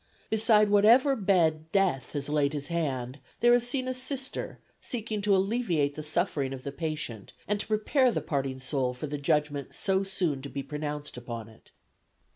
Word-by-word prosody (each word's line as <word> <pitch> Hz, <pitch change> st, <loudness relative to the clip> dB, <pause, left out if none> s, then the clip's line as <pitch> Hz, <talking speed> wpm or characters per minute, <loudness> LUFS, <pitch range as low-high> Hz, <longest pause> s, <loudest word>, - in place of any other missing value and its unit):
Beside 215 Hz, -1 st, +4 dB
whatever 235 Hz, +7 st, +6 dB
bed 165 Hz, -7 st, +1 dB
death 180 Hz, -11 st, +1 dB
has 145 Hz, -2 st, -2 dB
laid 145 Hz, -1 st, +1 dB
his 145 Hz, +1 st, -3 dB
hand, 135 Hz, -6 st, -2 dB, 0.2 s
there 240 Hz, +1 st, +5 dB
is 240 Hz, 0 st, +3 dB
seen 255 Hz, 0 st, -1 dB
a 255 Hz, -, -1 dB
Sister 260 Hz, +1 st, -3 dB, 0.2 s
seeking 220 Hz, -3 st, -3 dB
to 200 Hz, -1 st, +3 dB
alleviate 190 Hz, -8 st, +1 dB
the 155 Hz, -, -6 dB
suffering 150 Hz, -3 st, -1 dB
of 130 Hz, -1 st, -8 dB
the 140 Hz, -, -4 dB
patient 150 Hz, -, -5 dB
and 205 Hz, 0 st, 0 dB
to -, -, -4 dB
prepare 220 Hz, +5 st, +3 dB
the -, -, -1 dB
parting 135 Hz, -3 st, -2 dB
soul 130 Hz, -1 st, -1 dB
for 125 Hz, -, -5 dB
the 145 Hz, 0 st, -4 dB
judgment 145 Hz, -2 st, 0 dB
so 190 Hz, -1 st, +1 dB
soon 180 Hz, -8 st, -1 dB
to 140 Hz, -, -7 dB
be 140 Hz, 0 st, -4 dB
pronounced 150 Hz, -1 st, -5 dB
upon 115 Hz, -2 st, -6 dB
it." 110 Hz, -, -19 dB
155 Hz, 180 wpm, -28 LUFS, 140-210 Hz, 0.2 s, whatever